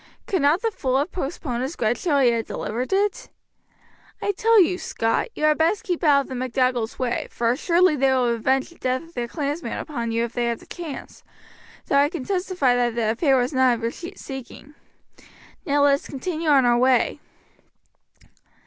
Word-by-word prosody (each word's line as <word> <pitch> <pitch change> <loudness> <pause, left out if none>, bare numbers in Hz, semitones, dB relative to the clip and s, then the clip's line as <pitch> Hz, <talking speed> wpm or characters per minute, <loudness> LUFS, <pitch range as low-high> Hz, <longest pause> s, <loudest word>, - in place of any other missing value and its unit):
Could 375 - -1
not 295 +8 +3
the 455 - +1
fool 260 -9 -1
have 295 +6 -1
postponed 270 -6 -4
his 270 +6 -3
grudge 225 +1 -1
till 305 -5 +1
he 255 -3 +4
had 230 -1 -2
delivered 240 - -4
it? 410 +5 0 0.9
I 405 - 0
tell 450 +3 +4
you, 365 0 +3
Scot, 225 0 -1
you - - -5
had 305 0 +3
best 335 +6 +2
keep 355 -2 -3
out 285 -3 +5
of - - -9
the - - -7
MacDougalls' 250 -2 -1
way, 245 -2 -2
for 230 0 0
assuredly 340 +5 +3
they 270 -1 +2
will 250 -2 +2
revenge 260 +3 0
the 340 - -19
death 255 +2 -1
of 330 +1 -17
their 240 -4 -3
clansman 295 +4 -3
upon 235 -6 -4
you 230 +1 0
if 235 0 -4
they 240 - -1
have 235 -1 -1
the - - -16
chance, 330 -6 -8 0.6
though 280 - +1
I 285 +1 +3
can 335 -5 -5
testify 360 -9 +1
that 240 -1 0
the 225 -2 +1
affair 270 +3 +2
was 250 +3 0
none 260 -1 +4
of 230 -1 -5
your 230 - 0 0.2
seeking. 270 0 -9 0.9
Now 285 0 +3
let 285 -1 +5
us 280 - -2
continue 315 +3 -3
our 260 -4 +5
way." 250 0 +2
270 Hz, 195 wpm, -23 LUFS, 245-325 Hz, 0.9 s, out